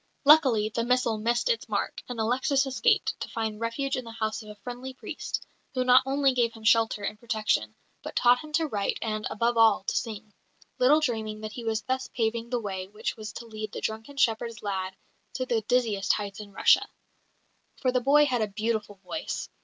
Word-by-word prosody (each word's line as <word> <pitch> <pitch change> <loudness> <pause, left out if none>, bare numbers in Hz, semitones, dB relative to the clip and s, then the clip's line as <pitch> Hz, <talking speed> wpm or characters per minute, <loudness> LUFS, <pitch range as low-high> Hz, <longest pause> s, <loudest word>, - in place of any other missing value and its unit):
Luckily, 260 -8 +6
the 230 +1 -1
missile 240 -2 +1
missed 235 - +1
its 475 -2 0
mark, - - -2
and 245 -2 -5
Alexis 260 +5 +2
escaped, 265 -1 +2
to - - -5
find 220 -2 -3
refuge 270 +4 -1
in 255 - -3
the 230 - -9
house 220 -1 -2
of 215 - -12
a 210 - -9
friendly 245 +5 -7
priest, - - -5 0.3
who 255 - +2
not 250 0 +7
only 275 0 +3
gave 235 -2 +1
him 225 - -13
shelter 225 -2 +3
and 210 +1 -3
protection, 215 - 0 0.3
but - - -8
taught 245 0 +5
him 310 -1 -10
to 325 +1 +2
write, 205 -9 -1
and, 215 -1 -2
above 235 +2 0
all, 220 -4 +5
to - - -2
sing 215 -2 -4 0.5
little 290 +5 +5
dreaming 220 -6 -2
that 215 0 -5
he 240 - -7
was 220 -1 -1
thus 260 0 -2
paving 230 0 -2
the 245 -1 0
way 190 -4 -4
which 210 +3 -4
was 215 -1 -7
to 235 - -8
lead 215 -2 -6
the - - -4
drunken 220 +6 -4
shepherd's 230 -2 0
lad 190 -2 -3 0.4
to 255 - -2
the 235 -3 0
dizziest 220 -4 +1
heights 200 -1 -4
in 205 -1 -9
Russia. - - +4 0.9
For 255 - +1
the 250 0 +1
boy 290 +4 +5
had 250 -4 0
a 215 - +1
beautiful 215 0 -2
voice. 310 - -4
230 Hz, 205 wpm, -27 LUFS, 215-250 Hz, 0.9 s, not